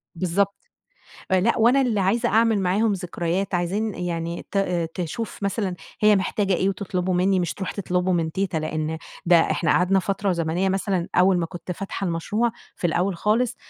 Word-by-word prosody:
بالضبط، 185 +3 0 0.8
آآ 185 - +4
لأ 230 +5 +2
وأنا 240 +5 +5
اللي 235 -6 +1
عايزة 225 +6 +2
أعمل 225 0 +3
معاهم 200 +4 +2
ذكريات 180 +1 -2
عايزين 195 +5 -1
يعني 170 -1 -4
ت 200 - 0 0.4
تشوف 195 +5 -5
مثلًا 200 -2 -1 0.3
هي 210 -1 +6
محتاجة 195 +1 0
إيه 190 - +1
وتطلبه 185 -1 -2
منّي 185 +1 +2
مش 175 -3 -2
تروح 190 - -4
تطلبه 180 -2 -1
من 165 -2 0
تيتة، 190 -3 -1
لأن 155 +1 -3 0.3
ده 175 - +7
إحنا 165 0 +1
قعدنا 185 +2 +3
فترة 195 +1 0
زمنية 170 +2 0
مثلًا 190 -2 -1
أول 180 0 +5
ما 170 - -1
كنت 175 +1 -6
فاتحة 195 +1 -4
المشروع 205 +8 0 0.3
في - - 0
الأول 180 +2 0
خالص 225 +5 +1
190 Hz, 170 wpm, -23 LUFS, 175-200 Hz, 0.8 s, ده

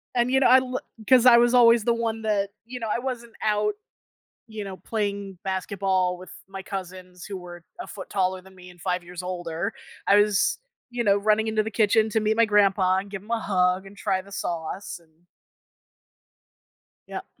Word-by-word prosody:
And 240 +1 +2
you 265 - +4
know, 270 - +4
I 255 +2 +8
l 255 0 -3 0.3
'cause 255 -2 +6
I 245 -2 +9
was 240 +1 +4
always 235 -2 +6
the 235 +1 +2
one 225 -1 -2
that 205 -2 0 0.2
you 250 +2 -7
know, 225 - -4
I - - 0
wasn't 240 -2 -5
out, 215 - +1 0.7
you 220 -2 -6
know, 190 -1 -7
playing 200 -3 -3
basketball 190 -1 -1
with 185 0 -12 0.2
my 195 0 -7
cousins 185 -2 -8
who 200 -2 -6
were 175 -1 -11 0.2
a - - -6
foot 195 - -9
taller 185 -1 0
than 190 +1 -17
me 180 0 -13
and 175 0 -16
5 180 0 -1
years 180 +1 -8
older, 175 +2 -4 0.3
I 200 - +5
was, 205 -1 +2 0.3
you 240 0 -2
know, 200 -3 +4
running 215 +2 +2
into 215 -1 +1
the 220 - -5
kitchen 220 0 +3
to 220 - +1
meet 215 0 +1
my 230 - +5
grandpa 195 -3 +3
and 200 +1 -8
give 195 -1 -7
him 215 - -10
a 230 - +1
hug 185 -2 +1
and 195 - -14
try 190 -1 0
the 200 +1 -17
sauce 175 +3 -4
an 165 - -26 2.0
Yep. - - -6
200 Hz, 200 wpm, -25 LUFS, 185-225 Hz, 2.0 s, I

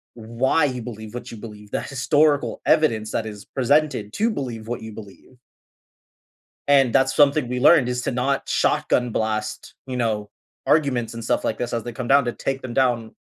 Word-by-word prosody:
why 120 +7 +1
you 125 -3 -3
believe 110 -2 -8
what 125 - -7
you 115 - -8
believe, 105 -2 -11
the - - -1
historical 145 +2 +1
evidence 115 -10 +2
that 110 - -2
is 105 -2 -8
presented 135 -5 0
to 225 +2 +1
believe 120 - -5
what 120 0 -4
you 110 0 -8
believe. 105 +4 -13 1.3
And 135 -4 +5
that's 135 +2 +3
something 145 -3 +3
we 125 0 -2
learned 140 -2 +6
is 125 0 -2
to - - -1
not 135 +2 -1
shotgun 125 -1 +1
blast, 110 -1 -3
you 130 -1 -4
know, 110 -4 -1 0.4
arguments 125 -7 +1
and 115 - -6
stuff - - 0
like 110 - -1
this 120 -1 -3
as 115 -2 -2
they 120 - -5
come 120 +1 -5
down 140 0 +5
to 120 - -2
take 135 +2 -3
them 120 -2 -6
down 120 -4 +1
125 Hz, 190 wpm, -22 LUFS, 110-135 Hz, 1.3 s, learned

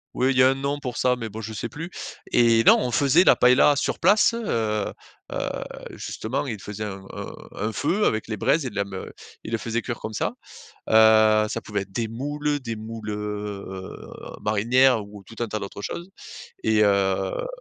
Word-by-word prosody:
ouais, 130 +2 +2
il 130 - -1
y - - +6
a 130 - +7
un 135 - +1
nom 140 +2 -2
pour 125 -4 -5
ça 125 0 +2
mais 115 -2 -5
bon, 110 - -8
je 110 0 -6
sais 120 - -4
plus. 165 +8 -7 0.4
Et 115 -1 +5
non, - - +7
on 125 - -1
faisait 140 +9 +4
la - - +6
paëlla 125 +4 +5
sur - - -1
place, 205 +6 +5
heu, 235 0 -4 0.9
heu, - - -3 0.3
justement, 130 +6 -4
il 110 -5 -4
faisait 105 +2 -6
un 95 -1 -7
un - - -6 0.4
un - - -2
feu 180 +8 +1
avec 110 0 0
les 110 -2 -4
braises 135 +7 +2
et 125 - -3
de - - -14
la 100 0 0
me 95 -1 -8 0.3
il 110 - -7
le 115 - 0
faisait 115 0 -2
cuire 120 -3 -4
comme 110 - -6
ça. - - 0 0.6
Heu, 110 -1 +6
ça 115 - -2
pouvait 105 -2 -2
être 100 - -9
des 115 +3 -2
moules, 145 +5 -2
des 115 -3 -5
moules, 110 0 -7
heu, 105 -2 -5 0.5
marinières 115 +3 +3
ou 100 -1 -12
tout 115 - -14
un - - -3
tas 110 - -3
d'autres 100 0 -7
choses. 175 - -5 0.6
Et 110 -1 +3
heu 95 - +1
115 Hz, 210 wpm, -24 LUFS, 105-130 Hz, 0.9 s, a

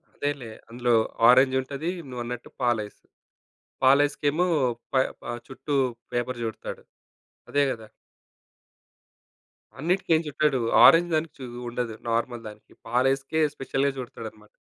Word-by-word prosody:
అదేలే, 145 -5 -3 0.2
అందులో 120 +1 0 0.4
ఆరెంజుంటది. 130 +5 +3 0.2
నువ్వన్నట్టు 125 -1 -6
పాలైస్. 110 -4 -1 0.9
పాలైస్‌కేమో 145 +4 +3 0.5
ప - - -12 0.4
ఆహ్, 120 0 -5
చుట్టూ 135 +2 -4 0.4
పేపర్ 120 0 -2
చుడతాడు. 110 -2 -6 0.7
అదే 145 - +3
గదా? 110 -1 -10 1.9
అన్నిటికేం 165 0 +2
జుట్టడు. 150 -2 +1 0.3
ఆరెంజ్ 175 +1 +6
దానికి 155 0 -1
చూ 130 - -6 0.2
ఉండదు, 120 -2 -3
నార్మల్ 115 0 -1
దానికి. 105 0 -13 0.2
పాలైస్‌కే 135 +5 +1
స్పెషల్‌గా 135 +1 0
చుడతాడనమాట. 110 -4 -8
130 Hz, 100 wpm, -26 LUFS, 120-145 Hz, 1.9 s, ఆరెంజ్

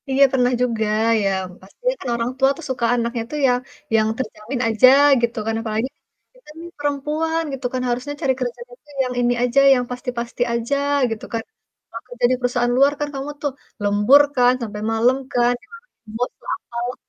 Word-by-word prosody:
Iya 270 +1 +4
pernah 250 -1 +3
juga 230 -3 0 0.4
ya 200 - +1 0.3
pasti 195 - -20 0.2
kan - - -7
orang 235 +1 -2
tua 270 0 +4
tuh 335 - -9
suka 250 -2 -1
anaknya 235 0 -2
itu 255 - -8
yang 245 -1 +2 0.4
yang 215 -1 +3
terjamin 240 +1 -5
aja 225 +3 +5 0.3
gitu 235 0 -1
kan 225 - -1
apalagi, 225 +3 -2 0.5
kita - - -20
nih 340 +1 -8
perempuan 300 +3 -1
gitu 265 -1 -6
kan 255 - -1
harusnya 250 +4 -2
cari 265 -1 +2
kerjaan 245 -1 -5
itu 295 - -29 0.2
yang 250 - -4
ini 245 0 +2
aja, 250 +2 +3
yang 250 -1 0
pasti-pasti 245 -1 -5
aja 235 +4 -1 0.4
gitu 225 - -5
kan, 230 - -2 0.5
kalau 230 - -7
kerja 245 0 -1
di - - +3
perusahaan 245 -1 0
luar 275 +2 +5
kan 295 - -1
kamu 275 +1 -5
tuh 290 - -1 0.3
lembur 205 +8 +5
kan 250 -1 +5
sampe 210 -2 -5
malem 235 +4 +3 0.2
kan, 240 0 +3
sampai 250 - -24
malam 470 +2 -18
lembur 225 +3 -3
lah, - - -5
apalah, 240 +1 -5
245 Hz, 190 wpm, -21 LUFS, 235-270 Hz, 0.5 s, aja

